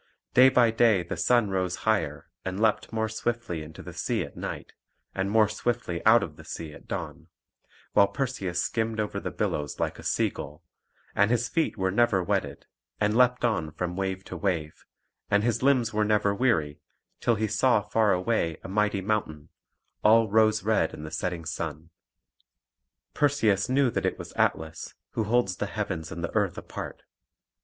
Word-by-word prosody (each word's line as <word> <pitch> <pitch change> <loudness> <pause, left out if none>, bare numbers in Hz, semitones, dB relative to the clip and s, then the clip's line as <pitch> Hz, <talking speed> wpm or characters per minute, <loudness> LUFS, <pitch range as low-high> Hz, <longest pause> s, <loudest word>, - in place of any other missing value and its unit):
Day 130 +1 +8
by 125 -3 +4
day 110 -5 +3
the 85 - -5
sun 120 -5 +2
rose 90 -1 0
higher 100 -10 0 0.2
and 95 +1 -4
leaped 110 -1 +1
more 110 -1 0
swiftly 110 -5 -3
into 75 +1 -10
the - - -9
sea - - -1
at - - -10
night, - - -6 0.4
and 95 +1 -1
more 110 0 +4
swiftly 110 -5 -2
out - - +7
of - - -7
the - - -12
sea 80 -2 -7
at - - -14
dawn; - - -5 0.7
while 100 - +6
Perseus 100 -6 -2
skimmed 110 -1 -1
over 105 -1 -2
the - - -4
billows 75 -1 -2
like - - -2
a - - -10
sea - - +1
gull, 75 +4 -9 0.5
and 100 +1 +3
his 120 0 +1
feet 165 -6 -1
were 95 -1 0
never 100 -3 +3
wetted; - - -2 0.3
and 105 +1 +1
leapt 125 0 +4
on 100 -10 0
from 90 +1 -3
wave 95 0 -2
to - - -8
wave, 85 -6 -2 0.4
and 100 0 +3
his 120 -1 0
limbs 130 -4 +3
were 105 0 +2
never 105 -1 +2
weary, 90 - +1 0.4
till 120 - +2
he 110 +1 0
saw 110 +3 +3
far 105 +1 +1
away 90 -3 0
a - - -6
mighty 105 0 +1
mountain, 95 -8 -2 0.5
all 115 +1 +6
rose 110 -1 +4
red 110 +1 +1
in 75 - -9
the 75 - -7
setting 90 -2 -3
sun. 80 0 -5 1.2
Perseus 125 -8 +2
knew 130 -1 +3
that - - 0
it - - -2
was - - -9
Atlas, 80 0 -1 0.2
who 110 - -1
holds 110 -4 +1
the 105 - -2
heavens 95 -6 -4
and 85 +1 -6
the 85 - -3
earth 100 -5 0
apart. - - -7
105 Hz, 180 wpm, -27 LUFS, 90-115 Hz, 1.2 s, Day